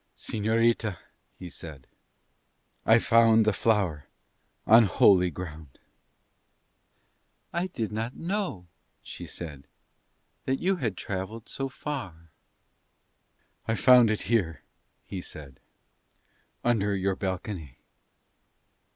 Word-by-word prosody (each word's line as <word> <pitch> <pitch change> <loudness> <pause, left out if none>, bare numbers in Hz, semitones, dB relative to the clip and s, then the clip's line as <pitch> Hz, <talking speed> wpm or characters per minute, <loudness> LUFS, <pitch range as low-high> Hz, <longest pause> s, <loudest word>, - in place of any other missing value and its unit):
"Señorita," 110 -2 0 0.4
he 90 - -8
said, 80 -6 -9 1.0
"I 110 - +7
found 115 -1 +5
the 110 - +3
flower 95 -10 0 0.6
on 115 +1 +7
holy 90 -2 +5
ground." 80 -5 -9 1.8
"I 175 +2 0
did 115 - -4
not 110 +3 -3
know," 180 - -3 0.4
she - - -8
said, 75 -5 -8 0.8
"that 130 0 0
you 190 +1 +1
had 115 - -2
travelled 100 +4 -5
so 135 0 -4
far." 90 - -7 1.4
"I 115 - +1
found 125 -1 +6
it 110 - -1
here," 95 -9 0 0.4
he 95 - -6
said, 70 -7 -8 1.0
"under 105 -4 +1
your 95 0 0
balcony." 95 - -5
105 Hz, 100 wpm, -27 LUFS, 90-115 Hz, 1.8 s, I